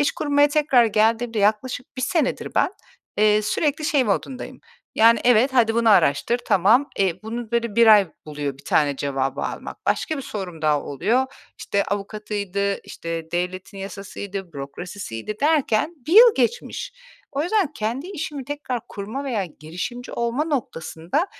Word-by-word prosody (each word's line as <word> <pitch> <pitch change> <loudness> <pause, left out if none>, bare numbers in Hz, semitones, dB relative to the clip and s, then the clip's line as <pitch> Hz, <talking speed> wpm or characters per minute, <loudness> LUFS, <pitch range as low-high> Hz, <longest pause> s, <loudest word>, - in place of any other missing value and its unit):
iş 290 - +2
kurmaya 290 -1 +3
tekrar 290 -5 +4
geldiğimde 225 +1 +1
yaklaşık 220 +6 0
1 255 - -3
senedir 295 0 -1
ben, - - +3 0.5
eee, 210 0 +4
sürekli 295 +7 0
şey 290 -3 +2
modundayım: 250 +4 -3 0.3
Yani, 230 +1 +5
"Evet, 245 +2 +5
hadi 230 -3 +3
bunu 230 -1 +3
araştır. 180 - +3
Tamam." 225 +10 +4
E, 185 -1 0
bunu, 225 +1 -5
böyle, 235 -2 -1
1 235 0 +6
ay 210 -4 +7 0.2
buluyor 145 -3 -4
bir - - -17
tane 145 -2 +2
cevabı 135 -1 -2
almak. - - -5
Başka 315 - 0
bir 275 - -5
sorum 190 - -6
daha 150 -2 +2
oluyor. 235 - 0 0.3
İşte, 200 - 0
avukatıydı, 200 -1 -3
işte, 165 -1 -6
devletin 180 +3 -3
yasasıydı, 195 -1 -7
bürokrasisiydi 155 - -7
derken 300 -1 +2
1 320 - -2
yıl 455 +3 +9
geçmiş. - - -1 0.4
O 280 +1 -1
yüzden 360 -2 +1
kendi 240 +5 -3
işimi 300 -7 -5
tekrar 275 -3 -4
kurma 215 +8 -5
veya 230 -8 -1
girişimci 180 - -7
olma 235 +5 -1
noktasında, 245 - -2
220 Hz, 150 wpm, -23 LUFS, 190-270 Hz, 0.5 s, yıl